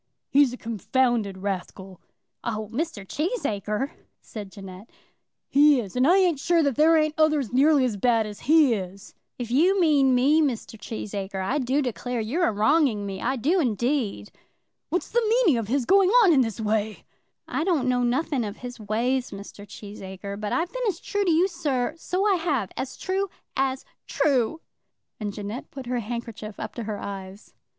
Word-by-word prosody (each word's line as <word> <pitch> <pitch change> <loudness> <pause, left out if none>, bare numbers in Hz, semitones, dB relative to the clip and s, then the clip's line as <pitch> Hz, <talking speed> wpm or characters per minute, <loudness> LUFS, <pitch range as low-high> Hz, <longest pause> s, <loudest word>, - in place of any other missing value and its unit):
"He's 280 -2 +5
a 250 - -7
confounded 230 -2 0
rascal." 190 -1 -5 0.4
"Oh, 215 -2 -3
Mr. 280 - -3
Cheesacre!" 270 - -2 0.3
said 205 -3 -9
Jeannette. 195 +2 -11 0.6
"He 290 -1 +5
is; 200 -6 -6
and 255 +2 +3
I 360 +3 +6
ain't 355 -7 +3
sure 335 +3 +2
that 280 -4 +1
there 320 +4 +5
ain't 310 -1 +2
others 305 -6 +2
nearly 280 +1 +4
as 225 -5 -2
bad 230 +1 +2
as 210 -1 -8
he 310 -6 +6
is." 195 -1 -6 0.2
"If 240 -2 -5
you 360 +10 +4
mean 285 -6 +4
me, 285 +6 +4
Mr. 250 -6 -2
Cheesacre, 200 -3 -5
I 270 +9 0
do 270 +3 +1
declare 245 0 -3
you're 260 +12 0
a - - +1
wronging 220 0 +2
me; 195 -1 -5
I 260 +3 0
do 305 - +1
indeed." 235 - -1 0.6
"What's 355 - -2
the 475 - +3
meaning 435 - +4
of 220 - -4
his 260 +2 0
going 390 +3 +5
on 365 -5 +6
in 270 - +5
this 225 -4 -2
way?" 215 -1 -1 0.4
"I - - -1
don't 325 -8 +1
know 250 -1 +2
nothing 255 +2 0
of 205 0 -5
his 245 -1 -8
ways, 240 +5 -1
Mr. 200 +1 -10
Cheesacre; 200 -1 -8
but 210 0 -4
I've 340 +2 -1
been - - -3
as 365 -5 -1
true 410 -1 -1
to 355 - +3
you, 335 +4 +4
sir; 305 -7 -1
so 365 +4 -2
I 400 -3 +3
have; 285 - -1
as 260 - -5
true 390 +1 -1 0.3
as 265 0 -1 0.2
true." 280 +1 +1 0.6
And 210 -2 -3
Jeannette 210 +4 -6
put 270 -2 -8
her 245 0 -1
handkerchief 230 -2 -6
up - - -5
to 235 - -6
her 210 -1 -3
eyes. 195 0 -8
250 Hz, 180 wpm, -25 LUFS, 210-305 Hz, 0.6 s, I